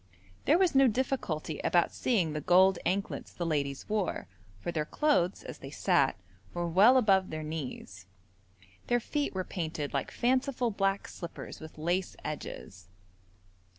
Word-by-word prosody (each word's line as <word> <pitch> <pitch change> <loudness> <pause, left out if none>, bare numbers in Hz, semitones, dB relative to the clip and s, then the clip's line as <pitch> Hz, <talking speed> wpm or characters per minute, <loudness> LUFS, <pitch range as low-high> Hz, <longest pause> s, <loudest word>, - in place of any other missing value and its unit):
There 310 - +5
was 370 -2 +3
no 270 0 +6
difficulty 220 - -2
about 175 -1 +2
seeing 185 -11 +1
the 150 - -3
gold 185 +3 +5
anklets 195 +2 -2
the 175 - -4
ladies 140 -4 -2
wore, 210 -4 -1 0.3
for 170 - -3
their 155 -2 -1
clothes, 195 - +1
as - - -8
they - - -8
sat, - - +2 0.4
were 175 0 -1
well 205 +10 +6
above 195 -6 +3
their 155 0 -4
knees. 130 - -6 0.8
Their 240 0 +3
feet 285 0 -2
were 185 - -1
painted 160 -5 -4
like 140 - -1
fanciful 255 -1 +1
black 195 -1 0
slippers 170 -2 -8
with 155 0 -11
lace 175 +4 -1
edges. 95 -10 -7
185 Hz, 150 wpm, -30 LUFS, 155-240 Hz, 0.8 s, no